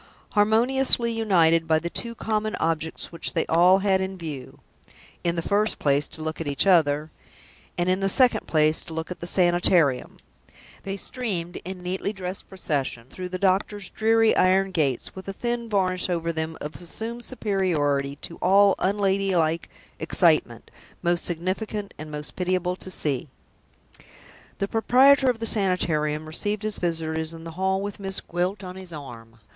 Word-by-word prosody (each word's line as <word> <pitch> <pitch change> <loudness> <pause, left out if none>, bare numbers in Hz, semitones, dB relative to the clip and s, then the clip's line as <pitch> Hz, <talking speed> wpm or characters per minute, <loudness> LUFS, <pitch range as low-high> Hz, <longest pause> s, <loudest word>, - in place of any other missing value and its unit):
Harmoniously 235 +3 +3
united 170 -8 +3
by 160 0 +4
the 165 +2 -3
two 235 -1 -1
common 215 -1 -2
objects 160 0 -2
which 170 - -1
they 165 - +1
all 175 +3 +5
had 190 -1 +3
in 190 0 -4
view 150 -7 -8 0.6
in 170 0 +1
the 165 - -2
first 210 +4 +1
place, 145 0 +2
to 160 - -7
look 160 +1 -4
at 160 - -4
each 140 +3 0
other, 155 -4 +3 0.7
and, 175 - 0
in 185 +1 +2
the 195 0 +1
second 245 0 +4
place, 155 0 +3
to 165 - -8
look 160 +2 -4
at 180 - -6
the 170 - -4
Sanitarium 175 -6 +2 0.6
they 195 0 -5
streamed 185 -7 -4
in 185 0 -8
neatly 185 +3 -2
dressed 190 -2 -7
procession 140 -10 -3
through 180 -1 -6
the 185 - -4
doctor's 195 +1 0
dreary 225 0 +3
iron 190 +1 +3
gates, 140 -8 -1
with 190 0 -10
a 195 - -4
thin 235 +2 -3
varnish 185 -3 +1
over 170 -1 -1
them 160 0 -3
of 150 - -5
assumed 225 +8 -5
superiority 160 - 0
to 170 - -6
all 195 +2 +5
unladylike 190 -4 +1 0.3
excitement, - - +2 0.3
most 175 0 +1
significant 195 +4 -3
and 155 0 -7
most 150 0 -7
pitiable 180 0 -1
to 185 - -9
see! 145 -6 -2 1.3
The 195 - -1
proprietor 260 +5 +5
of 245 - 0
the 225 - -4
Sanitarium 155 -8 +1
received 205 +7 -3
his 215 -1 -2
visitors 160 -1 -2
in 165 - -11
the 165 - -7
hall 190 +3 0
with 205 0 -5
Miss 195 -1 -2
Gwilt 180 +3 -3
on 180 0 -7
his 185 -2 -10
arm. 115 -7 -10
185 Hz, 165 wpm, -25 LUFS, 160-200 Hz, 1.3 s, all